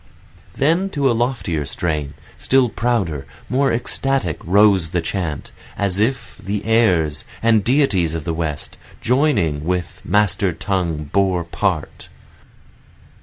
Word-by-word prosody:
Then 165 +7 +2
to 135 -2 +3
a - - +2
loftier 115 - -1
strain, 75 -1 -3 0.2
Still 130 -2 +2
prouder, 105 - -1 0.2
more 135 +2 +2
ecstatic 120 - -1
rose 95 -2 +4
the 90 - 0
chant, 80 -4 -3 0.3
As 100 -1 0
if 115 +2 -1
the 100 +1 -3
heirs, 90 -10 +2 0.2
the 115 -1 +5
deities 100 - +2
of 80 - -4
the 85 - -2
West, 80 -3 -4 0.2
Joining 120 - +1
with 90 +1 -3
master 100 -2 +1
tongue 80 -5 -2
bore 95 -3 +2
part. 85 -1 -3
95 Hz, 125 wpm, -20 LUFS, 80-120 Hz, 0.3 s, the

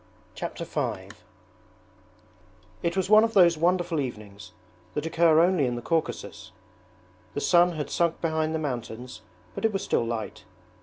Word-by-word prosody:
Chapter - - -5
V - - -3 1.7
It 170 +2 -1
was 190 - +1
one 215 +2 +7
of 225 0 -1
those 175 -3 +6
wonderful 175 0 +1
evenings 105 -6 -7 0.4
that 150 - -2
occur 165 -1 +4
only 175 -6 +3
in 120 - -2
the 120 - -5
Caucasus. 165 - -3 0.8
The - - -1
sun 175 +3 +4
had 150 -3 -5
sunk 170 -1 0
behind 160 -1 -1
the - - +1
mountains 125 -5 -5 0.3
but - - -7
it 225 - +3
was 195 -2 -3
still - - +1
light. 115 -2 -5
160 Hz, 150 wpm, -26 LUFS, 130-175 Hz, 1.7 s, one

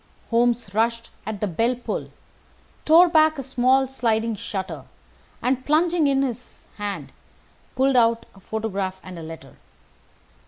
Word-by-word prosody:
Holmes 235 -3 +1
rushed 230 +2 0 0.2
at 215 -2 -4
the 210 - +1
bell 230 +8 +1
pull, 245 - -5 0.8
tore 335 +3 +7
back 315 -2 +4
a 275 - -4
small 260 +1 +2
sliding 230 -3 0
shutter, 195 -1 -5 0.6
and, 255 0 +1
plunging 320 +1 +2
in 275 -1 +2
his 250 -2 -6
hand, 195 -10 -5 0.6
pulled 265 +1 +2
out 230 -1 +3
a 195 - -17
photograph 195 -2 -3
and 185 -2 -9
a - - -7
letter. 160 -4 -10
235 Hz, 135 wpm, -23 LUFS, 205-265 Hz, 0.8 s, tore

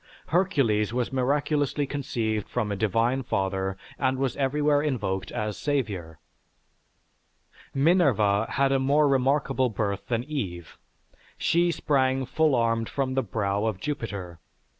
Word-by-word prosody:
Hercules 140 - +2
was 125 +1 -2
miraculously 145 +2 +1
conceived 120 -7 -2
from 110 -4 -1
a - - -1
divine 115 +6 +1
father 95 -4 -1 0.2
and 130 -1 +1
was 135 -1 -1
everywhere 145 +1 +2
invoked 100 -10 -2
as 105 -1 -3
savior. 100 - -2 1.5
Minerva 135 - +3
had 140 -1 +1
a 135 - +3
more 145 +3 +3
remarkable 135 -1 +2
birth 100 -3 -3
than 120 -1 0
Eve; 95 - -5 0.6
she 175 +1 +2
sprang 135 -5 +1
full 155 +2 +2
armed 115 -1 +1
from 135 -2 -1
the 135 - +2
brow 100 -2 -1
of 110 -4 -1
Jupiter. 100 - -5
125 Hz, 125 wpm, -26 LUFS, 105-140 Hz, 1.5 s, Minerva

